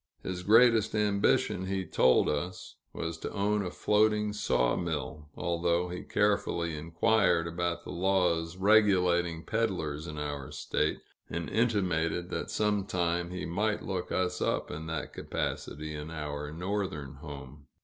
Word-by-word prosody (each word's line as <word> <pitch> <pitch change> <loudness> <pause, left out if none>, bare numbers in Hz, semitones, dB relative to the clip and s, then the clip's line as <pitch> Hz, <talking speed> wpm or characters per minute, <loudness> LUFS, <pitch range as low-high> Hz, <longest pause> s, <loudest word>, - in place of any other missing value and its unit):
His 90 -1 -4
greatest 110 +2 +5
ambition, 100 -2 +2
he 95 -1 -1
told 65 -5 +4
us, 90 +5 -3
was 80 0 -4
to - - -5
own 105 0 +1
a 90 - -3
floating 105 +2 +2
sawmill; 75 -3 -1
although 85 +1 0
he 90 - -5
carefully 95 -5 0
inquired 85 +2 +2
about 85 +1 -2
the - - -7
laws 90 -2 +1
regulating 90 -5 +3
peddlers 90 -9 -1
in 75 - -6
our 75 -2 -4
State, - - -1 0.3
and 85 0 -3
intimated 90 -6 +1
that - - -3
sometime 90 -5 0
he 90 0 -4
might 105 +5 -1
look 95 -2 -3
us 90 -1 0
up - - 0
in 80 +2 -6
that 80 -1 -4
capacity, 75 +1 -4
in 75 +1 -6
our 75 -2 -5
Northern 90 -5 -3
home. 70 -1 -10
90 Hz, 135 wpm, -30 LUFS, 80-100 Hz, 0.3 s, greatest